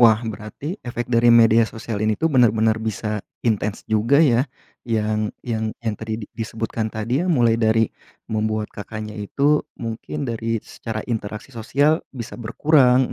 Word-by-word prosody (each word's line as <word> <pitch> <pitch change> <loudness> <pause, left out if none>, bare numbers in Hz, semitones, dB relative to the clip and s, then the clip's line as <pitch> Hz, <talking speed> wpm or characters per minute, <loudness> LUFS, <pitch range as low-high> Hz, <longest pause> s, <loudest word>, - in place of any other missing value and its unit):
Wah, 115 -1 +6
berarti 110 - -6
efek 120 0 -4
dari 120 +1 +5
media 115 -1 +6
sosial 110 -2 -5
ini 110 0 +1
tuh 160 -1 0
benar-benar 110 -3 +4
bisa 105 -1 -2 0.2
intens 105 -2 0
juga 110 +5 +2
ya, 130 0 +3 0.4
yang 110 -1 0 0.2
yang 110 -2 -2
yang 110 -2 0
tadi 110 0 -3
di - - -15
disebutkan 110 0 -3
tadi 110 +6 -1
ya, 180 - -1
mulai 120 -8 +3
dari 110 0 +4 0.5
membuat 110 0 -1
Kakaknya 110 +1 -6
itu 140 +8 +2 0.2
mungkin 115 +6 -4
dari 115 -2 -2
secara 110 -2 -6
interaksi 110 +1 -4
sosial 140 +7 +2
bisa 120 -2 -8
berkurang, 130 +1 +3
115 Hz, 150 wpm, -22 LUFS, 110-120 Hz, 0.5 s, Wah